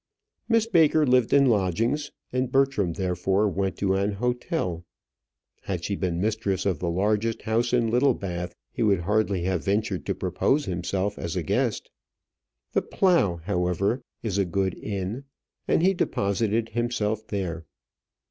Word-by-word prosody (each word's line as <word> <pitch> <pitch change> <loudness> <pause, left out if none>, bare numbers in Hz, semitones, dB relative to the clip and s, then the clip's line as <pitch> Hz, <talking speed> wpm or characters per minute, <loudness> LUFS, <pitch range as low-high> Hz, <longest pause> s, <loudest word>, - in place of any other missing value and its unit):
Miss 225 -1 +4
Baker 160 -7 +4
lived 125 -3 +3
in 140 -1 +6
lodgings, 115 - +1 0.2
and 130 0 0
Bertram 135 -10 +2
therefore 95 +2 +1
went 95 -2 -1
to 95 -1 +1
an 100 +2 0
hotel. 120 - -2 0.8
Had 90 -3 -3
she 100 - -1
been 90 -3 -2
mistress 105 -2 -1
of 95 -7 0
the 85 - -1
largest 105 +5 0
house 115 +2 +1
in 120 -2 +2
Littlebath, 95 -9 0 0.2
he - - -5
would 100 -5 +3
hardly 100 -1 +1
have 90 -2 -1
ventured 100 -1 -1
to - - 0
propose 145 +2 0
himself 95 +2 -2
as 85 - -4
a - - -1
guest. - - -1 0.8
The - - +2
"Plough," 135 - +2
however, 95 +5 0 0.2
is 100 -4 -1
a 100 - +2
good 95 +1 0
inn, 100 +6 -4 0.4
and - - +2
he 190 +2 +5
deposited 110 - 0
himself 110 -2 -1
there. 85 -5 -4
105 Hz, 150 wpm, -26 LUFS, 95-120 Hz, 0.8 s, in